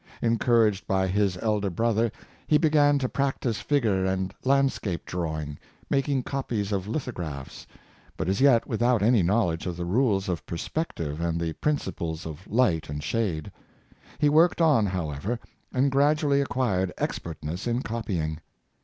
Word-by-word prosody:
Encouraged 115 Hz, -3 st, +2 dB
by 95 Hz, -1 st, +2 dB
his 95 Hz, 0 st, +1 dB
elder 105 Hz, -3 st, +1 dB
brother, 115 Hz, +3 st, +1 dB, 0.4 s
he 150 Hz, -, +5 dB
began 150 Hz, -2 st, +4 dB
to 135 Hz, -2 st, 0 dB
prac 135 Hz, +1 st, -1 dB
tice 115 Hz, -4 st, -1 dB
figure 110 Hz, -10 st, +1 dB
and 95 Hz, 0 st, -1 dB
landscape 135 Hz, -9 st, +1 dB
drawing, 80 Hz, -4 st, -4 dB, 0.3 s
making 135 Hz, -1 st, +1 dB
copies 115 Hz, -7 st, -2 dB
of 100 Hz, -1 st, -1 dB
lithographs, 90 Hz, -, -5 dB, 0.5 s
but -, -, -2 dB
as 95 Hz, +6 st, 0 dB
yet 130 Hz, -5 st, +5 dB
without 120 Hz, -1 st, +1 dB
any 115 Hz, -1 st, +4 dB
knowledge 90 Hz, -2 st, +1 dB
of 90 Hz, -1 st, -4 dB
the 90 Hz, -, -3 dB
rules 100 Hz, 0 st, +1 dB
of 90 Hz, -4 st, -2 dB
perspective 85 Hz, -, -3 dB
and 85 Hz, 0 st, 0 dB
the 85 Hz, -1 st, -2 dB
principles 85 Hz, -, -2 dB
of 80 Hz, +3 st, -8 dB
light 95 Hz, -11 st, +1 dB
and 75 Hz, 0 st, -4 dB
shade. 85 Hz, -2 st, -1 dB, 0.7 s
He 150 Hz, -, +3 dB
worked 160 Hz, +5 st, +4 dB
on, 145 Hz, -11 st, +4 dB
however, 90 Hz, -, -3 dB, 0.3 s
and 135 Hz, +2 st, +2 dB
gradually 145 Hz, +1 st, +3 dB
ac 140 Hz, -, 0 dB
quired 95 Hz, -8 st, 0 dB
expertness 85 Hz, +4 st, -4 dB
in 120 Hz, +2 st, 0 dB
copying. 90 Hz, -9 st, -3 dB
105 Hz, 150 wpm, -26 LUFS, 85-130 Hz, 0.7 s, he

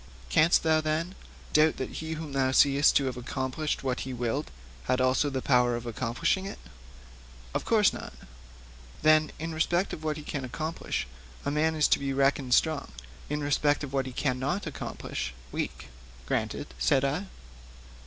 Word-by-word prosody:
'Canst 165 Hz, +3 st, +5 dB
thou, 160 Hz, -1 st, +3 dB
then, 155 Hz, +4 st, -1 dB, 0.4 s
doubt 155 Hz, +1 st, +4 dB
that 130 Hz, -, -4 dB
he 160 Hz, 0 st, -4 dB
whom 155 Hz, -2 st, -6 dB
thou 135 Hz, -1 st, +2 dB
seest 140 Hz, +2 st, +5 dB
to 140 Hz, -, +4 dB
have 130 Hz, -1 st, -3 dB
accomplished 130 Hz, +5 st, -3 dB
what 130 Hz, -2 st, -1 dB
he 130 Hz, -1 st, -4 dB
willed 125 Hz, +5 st, -2 dB, 0.4 s
had 130 Hz, -, +1 dB
also 130 Hz, +3 st, +3 dB
the 130 Hz, -2 st, -3 dB
power 125 Hz, -2 st, +3 dB
to 120 Hz, -, -9 dB
accomplish 120 Hz, +1 st, 0 dB
it?' 195 Hz, +1 st, -6 dB, 1.0 s
'Of -, -, -2 dB
course 215 Hz, -3 st, +4 dB
not.' -, -, -7 dB, 0.9 s
'Then, 155 Hz, 0 st, +5 dB
in 165 Hz, +1 st, -4 dB
respect 175 Hz, +4 st, +1 dB
of 155 Hz, -, -7 dB
what 155 Hz, -1 st, -1 dB
he 150 Hz, -, -7 dB
can 145 Hz, -2 st, -4 dB
accomplish 155 Hz, -, -3 dB, 0.4 s
a -, -, 0 dB
man 160 Hz, +2 st, +1 dB
is 150 Hz, -2 st, +4 dB
to -, -, +4 dB
be 140 Hz, -1 st, -2 dB
reckoned 135 Hz, -2 st, +3 dB
strong, 155 Hz, -3 st, +1 dB, 0.4 s
in 150 Hz, 0 st, -2 dB
respect 145 Hz, +1 st, +2 dB
of 140 Hz, -1 st, -6 dB
what 135 Hz, -1 st, 0 dB
he -, -, -5 dB
cannot 135 Hz, +8 st, -1 dB
accomplish 135 Hz, -, -5 dB, 0.2 s
weak?' 70 Hz, -1 st, -4 dB, 0.4 s
'Granted,' -, -, -2 dB
said 70 Hz, -, +3 dB
I. 155 Hz, +9 st, -1 dB
145 Hz, 170 wpm, -28 LUFS, 130-155 Hz, 1.0 s, Canst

